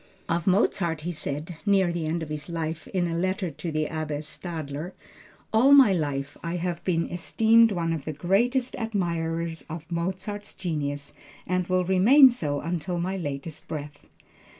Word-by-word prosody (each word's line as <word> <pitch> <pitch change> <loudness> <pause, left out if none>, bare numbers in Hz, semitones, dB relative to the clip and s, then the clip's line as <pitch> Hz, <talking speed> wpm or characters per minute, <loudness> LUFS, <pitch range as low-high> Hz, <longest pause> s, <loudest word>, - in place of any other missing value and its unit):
Of 170 +1 -1
Mozart, 180 -4 +2
he 175 +3 -3
said, 155 +1 -5
near 195 -4 +3
the 165 -2 -2
end 165 +1 -1
of 155 - -7
his 150 0 -5
life, 160 -1 -4
in 180 -2 0
a 165 - -2
letter 185 +1 -1
to 165 +3 -5
the 155 0 0
Abbe 155 -2 -3
Stadler, 155 0 -6 0.6
"All 255 +6 +6
my 270 -8 +8
life 145 -4 -2
I 170 +1 -2
have 175 -1 -3
been 165 -3 0
esteemed 225 +6 +4
one 165 -3 0
of 155 -4 -5
the 155 - -2
greatest 235 - +1
admirers 170 -6 -2
of 160 0 -6
Mozart's 190 +4 -4
genius 145 -5 -3 0.3
and 180 0 0
will 185 0 +1
remain 240 +10 +7
so 145 -11 -2
until 175 +1 -2
my 185 +3 -1
latest 150 -2 -5
breath." 145 -2 -7
170 Hz, 165 wpm, -26 LUFS, 155-190 Hz, 0.6 s, my